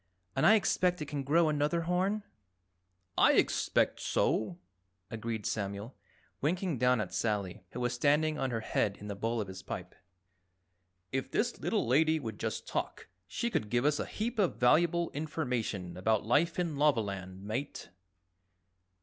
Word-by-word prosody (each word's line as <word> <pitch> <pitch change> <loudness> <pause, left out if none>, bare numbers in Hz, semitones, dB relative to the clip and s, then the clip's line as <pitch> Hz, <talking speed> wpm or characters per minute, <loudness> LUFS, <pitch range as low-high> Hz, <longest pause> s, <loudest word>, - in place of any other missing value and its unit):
And 135 - +4
I 220 - +8
expect 180 -4 +2
it - - -6
can 145 0 -3
grow 160 +5 +3
another 150 +2 +1
horn?" 185 +5 0 1.0
"I - - +6
expect - - +2
so," 170 +10 0 0.5
agreed 115 -1 -4
Samuel, 100 +3 -3 0.5
winking 170 -1 0
down 125 -1 +4
at 105 -4 -3
Sally, 105 -5 -1
who 125 - -6
was 120 0 0
standing 150 +4 +2
on 135 - 0
her 115 -2 -2
head 105 -2 0
in 105 - -9
the 100 - -3
bowl 115 +3 -1
of 105 - -2
his 95 0 -8
pipe. 90 0 -6 1.2
"If 135 0 -2
this - - 0
little - - 0
Lady 155 +6 +3
would 115 -6 -6
just - - -3
talk, - - -4 0.2
she 235 - -2
could 105 - -1
give 120 +3 +1
us 150 0 +2
a - - -2
heap 230 +2 -3
of 190 -4 +2
valuable 170 +7 +3
information 125 - -3
about 105 +4 +1
life 150 +9 +2
in 170 -5 -1
Lavaland, 100 -9 0
Mate." 115 +3 -4
130 Hz, 160 wpm, -31 LUFS, 110-160 Hz, 1.2 s, I